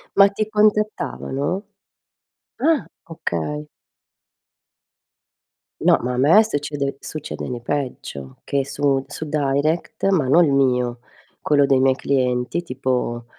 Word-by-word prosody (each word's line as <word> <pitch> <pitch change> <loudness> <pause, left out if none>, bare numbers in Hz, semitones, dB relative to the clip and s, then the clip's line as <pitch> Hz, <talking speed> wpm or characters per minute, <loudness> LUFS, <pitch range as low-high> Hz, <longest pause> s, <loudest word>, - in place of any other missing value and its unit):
Ma 200 0 +8
ti 210 +1 -2
contattavano? 200 - 0 0.9
Ah, 320 -5 +2 0.2
okay. 150 - -4 2.1
No, - - +4
ma 125 +1 -2
a 125 - -3
me 155 +11 +6
succede 145 -6 -3
succede 155 -2 -6
ne 125 -1 -4
peggio, 120 - -5
che 140 -1 0
su 140 -1 0
su 155 - -6
Direct, 150 +5 0
ma 175 -8 +2
non 165 +7 +5
il 140 - +1
mio, 125 -3 +1 0.4
quello 145 -2 +3
dei 135 -1 +3
miei 130 0 +4
clienti, 130 +3 0
tipo 125 -5 -2
140 Hz, 115 wpm, -21 LUFS, 125-160 Hz, 2.1 s, Ma